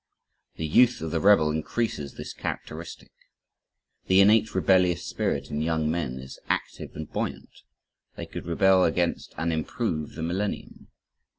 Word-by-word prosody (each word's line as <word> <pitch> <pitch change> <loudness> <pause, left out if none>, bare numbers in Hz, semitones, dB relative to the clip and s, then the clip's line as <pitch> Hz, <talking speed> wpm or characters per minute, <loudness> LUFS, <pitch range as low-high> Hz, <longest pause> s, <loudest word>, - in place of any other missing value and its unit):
The 80 - -3
youth 125 +10 +4
of 80 - -3
the 85 - 0
rebel 95 -5 +5
increases 80 - -2
this - - -7
characteristic. 80 +2 -6 1.0
The 95 0 +5
innate 110 +2 +5
rebellious 90 -2 +3
spirit - - -2
in 75 +1 -2
young 80 -1 0
men 75 -7 -2
is 65 +1 -10
active - - -3
and 80 0 -6
buoyant. - - -5 0.5
They - - -6
could - - -8
rebel 95 +2 +4
against 85 -1 0
and 85 0 0
improve 80 0 -2
the 80 - -5
millennium. 95 +5 -3
85 Hz, 140 wpm, -26 LUFS, 80-95 Hz, 1.0 s, rebel